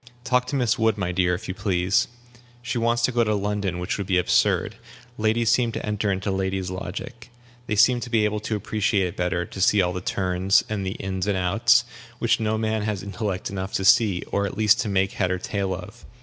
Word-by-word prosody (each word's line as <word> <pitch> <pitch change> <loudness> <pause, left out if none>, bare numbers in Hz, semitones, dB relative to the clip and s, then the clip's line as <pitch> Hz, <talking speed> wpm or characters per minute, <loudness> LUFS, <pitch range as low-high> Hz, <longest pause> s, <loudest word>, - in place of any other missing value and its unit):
Talk 125 -1 +1
to - - -3
Miss 125 -1 +1
Wood, 110 -1 +2
my 90 -3 -2
dear, 90 0 +1
if 105 +5 -8
you 95 - -3
please. 95 -1 +1 0.6
She 120 0 -2
wants 120 +1 +1
to 130 - +3
go 120 -1 +2
to 105 -1 +1
London, 100 -2 -2
which 90 +3 -3
would 100 - -3
be 95 -1 +2
absurd. 90 - +2 0.4
Ladies 110 +1 +1
seem 120 0 +2
to - - -4
enter 105 -1 -1
into 95 +1 -2
ladies' 95 -1 -2
logic. 100 +6 -7 0.4
They 105 - -1
seem 120 +4 +5
to 120 - -6
be 115 -3 +2
able 105 0 -1
to 110 +1 -3
appreciate 105 -2 0
it 90 - -5
better, 90 -1 -1
to 95 - -8
see 105 +1 +4
all 90 -1 +2
the 90 - -4
turns, 95 +1 +1
and 105 -2 -3
the 95 0 -2
ins 95 0 -3
and 100 -2 +1
outs, 115 +7 +3 0.3
which 115 -1 +1
no 110 0 0
man 110 0 -1
has 105 -2 -3
intellect 100 -2 -4
enough 95 0 -5
to 95 - -1
see, 100 -3 +4
or 100 0 0
at - - -8
least 110 0 +4
to 105 - -3
make 95 0 +1
head 95 -2 -1
or 95 - 0
tail 100 +1 -3
of. 95 +6 -7
100 Hz, 230 wpm, -24 LUFS, 95-110 Hz, 0.6 s, seem